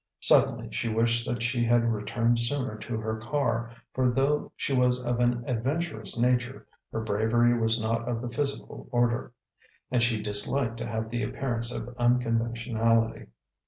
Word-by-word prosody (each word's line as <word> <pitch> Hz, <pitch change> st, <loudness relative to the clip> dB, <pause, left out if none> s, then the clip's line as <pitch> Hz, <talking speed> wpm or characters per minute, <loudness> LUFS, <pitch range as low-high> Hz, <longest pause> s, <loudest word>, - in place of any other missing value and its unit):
Suddenly -, -, +3 dB
she -, -, -2 dB
wished 115 Hz, +1 st, +1 dB
that 120 Hz, -1 st, -2 dB
she 120 Hz, 0 st, 0 dB
had 115 Hz, 0 st, +3 dB
returned 115 Hz, +3 st, +1 dB
sooner 125 Hz, 0 st, +2 dB
to 110 Hz, +1 st, -5 dB
her 110 Hz, 0 st, -3 dB
car, 115 Hz, -1 st, -1 dB, 0.2 s
for 130 Hz, -1 st, +2 dB
though 135 Hz, +4 st, 0 dB
she 140 Hz, -, -2 dB
was 125 Hz, -1 st, +2 dB
of 120 Hz, 0 st, 0 dB
an 120 Hz, 0 st, +1 dB
adventurous 125 Hz, -1 st, -2 dB
nature, 125 Hz, +2 st, 0 dB, 0.3 s
her 110 Hz, -, -2 dB
bravery 110 Hz, +3 st, +2 dB
was 115 Hz, 0 st, +1 dB
not 115 Hz, +2 st, -1 dB
of 120 Hz, -2 st, -1 dB
the 120 Hz, +1 st, -5 dB
physical 140 Hz, +2 st, -3 dB
order; 120 Hz, -1 st, +1 dB, 0.6 s
and 125 Hz, -2 st, +2 dB
she 115 Hz, -2 st, +2 dB
disliked 110 Hz, +4 st, -1 dB
to 115 Hz, -, -4 dB
have 110 Hz, -1 st, -3 dB
the 120 Hz, 0 st, -1 dB
appearance 120 Hz, -3 st, -1 dB
of 120 Hz, 0 st, -6 dB
unconventionality. 115 Hz, -1 st, +1 dB
120 Hz, 160 wpm, -27 LUFS, 115-125 Hz, 0.6 s, Suddenly